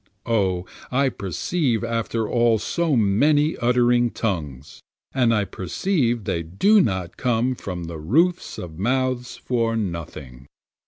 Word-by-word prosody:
O 95 -6 0 0.2
I 135 +1 +2
perceive 120 - -1
after 115 -1 -1
all 120 -1 +3
so 165 +7 0
many 145 +9 +3
uttering 120 0 +3
tongues, 75 - -4 0.3
And 125 -3 +3
I 105 -3 +2
perceive 120 - -1
they 95 -5 -1
do 145 - +3
not 95 - -2
come 125 0 +1
from 90 -7 -6
the 85 -1 -6
roofs 165 - +1
of 85 -2 -8
mouths 125 +2 -1
for 115 -2 -1
nothing. 75 - -6
115 Hz, 125 wpm, -23 LUFS, 90-130 Hz, 0.3 s, all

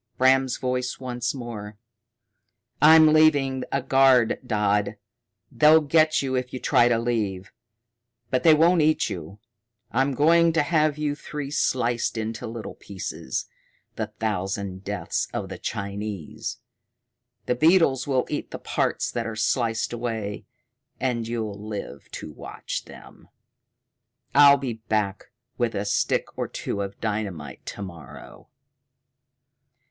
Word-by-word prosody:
Bram's 130 0 +3
voice 125 -1 -2
once 125 -1 -3
more: 110 -5 -7 1.0
"I'm 155 0 +8
leaving 145 -4 +3
a 135 -1 0
guard, 130 -3 +4
Dodd. 105 -3 0 0.5
They'll 150 +5 +6
get 155 0 +3
you 130 -1 -2
if 125 -1 -2
you 130 - -5
try 120 - +4
to 120 -1 +3
leave. 105 -5 -2 0.8
But 130 -1 +2
they 160 +3 +6
won't 165 +2 +4
eat 155 +1 +2
you. 90 +3 -7 0.5
I'm 135 +4 +1
going 165 +4 +4
to 160 -2 +3
have 155 -1 +1
you 150 -1 -1
three 145 -1 -6
sliced 120 -5 0
into 110 +2 -4
little 115 0 -7
pieces, 95 -9 -5 0.5
the - - -3
Thousand 95 -2 -3
Deaths 100 -4 -2
of - - -3
the - - -7
Chinese. 100 +3 -5 0.9
The - - +1
beetles 155 -1 +3
will 130 -2 +1
eat - - -4
the - - -6
parts - - -1
that 115 -1 -3
are 115 - -5
sliced 115 +1 0
away 115 -4 -4 0.5
and 120 -3 -1
you'll 110 -3 -4
live 105 -1 -7
to - - -7
watch - - -6
them. - - -14 1.1
I'll 140 0 +8
be 130 -3 -3
back 110 -3 -2 0.3
with 120 -2 0
a 100 +1 -2
stick 100 - 0
or - - -1
two 100 - -4
of 100 0 -6
dynamite 105 -8 -4
to 100 - -6
morrow." 85 -5 -11
120 Hz, 130 wpm, -25 LUFS, 105-140 Hz, 1.1 s, I'm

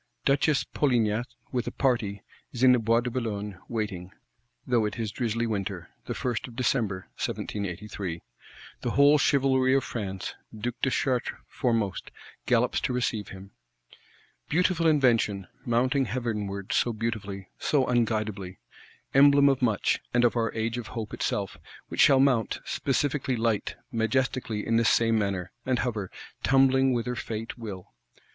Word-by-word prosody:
Duchess 140 +1 +3
Polignac, 120 -4 +1 0.2
with 125 -2 -1
a - - -2
party, 115 -7 0 0.3
is 125 0 -3
in 130 - +8
the 125 - +5
Bois 115 +1 +3
de 125 0 -3
Boulogne, 105 -6 -3
waiting; 105 -6 -3 0.6
though 120 -3 +2
it 105 - -3
is 110 -3 -2
drizzly 115 0 -1
winter; 100 -5 -3
the - - -4
1st 120 -2 -2
of 120 - -12
December 115 -7 0
1783. 95 -3 -4 0.6
The - - -1
whole 145 +2 +5
chivalry 130 -2 +3
of 135 - +2
France, 95 -5 -4 0.2
Duke 120 +2 -4
de 135 - +2
Chartres 130 -2 0
foremost, 115 -6 -1 0.4
gallops - - +2
to - - -1
receive 115 -4 -1
him. 95 +1 -11 1.0
Beautiful 175 0 +2
invention; 115 -10 +3 0.2
mounting 130 +3 +2
heavenward, 105 -4 -3
so 120 - +2
beautifully,—so 110 +4 -2
unguidably! 110 -6 -1 0.6
Emblem 140 +1 +7
of 135 -2 +1
much, 110 -5 +2 0.2
and 120 - +4
of 120 - +2
our 115 -1 +1
Age 115 +2 -1
of 120 - -7
Hope 110 -2 -4
itself; 100 -2 -2 0.3
which - - 0
shall 135 -2 +7
mount, 130 -5 +2
specifically 135 -1 0
light, 115 -2 0 0.2
majestically 115 -1 0
in 115 - +2
this 115 0 +4
same 115 -1 +3
manner; 95 -4 -2
and 130 -1 +1
hover,—tumbling 130 +4 +1
whither 125 0 -1
Fate 115 -2 -5
will. 105 -6 -8
115 Hz, 140 wpm, -27 LUFS, 105-130 Hz, 1.0 s, in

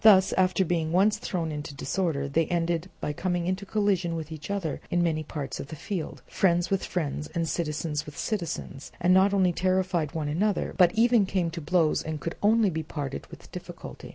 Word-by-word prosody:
Thus, 190 -4 +7
after 185 0 +3
being 160 -2 0
once 205 +4 +3
thrown 170 -6 -2
into 150 -1 -5
disorder, 160 -5 -1
they 160 +3 +1
ended 170 0 0
by 150 - -1
coming 175 +1 -1
into 185 +2 -2
collision 195 -6 +1
with 160 -1 -5
each 155 +1 -7
other 195 -7 -2
in 175 0 +2
many 160 -2 +1
parts 145 -3 -5
of - - -5
the 155 - -7
field, 175 +2 -5
friends 175 -1 +1
with 195 - +1
friends, 150 -3 -2
and 165 -1 0
citizens 150 -2 -2
with 150 - -9
citizens, 170 -8 -3
and 180 +1 +4
not 190 +2 +5
only 190 -3 +3
terrified 185 -4 0
one 155 -2 -1
another, 190 +7 0
but 180 -2 +6
even 230 -2 +4
came 180 -3 0
to 170 0 -5
blows 160 0 +2
and 155 -1 -4
could 165 - -3
only 215 -1 +4
be 160 -1 -2
parted 145 -3 -5
with - - -13
difficulty. - - -8
170 Hz, 200 wpm, -27 LUFS, 155-190 Hz, -, Thus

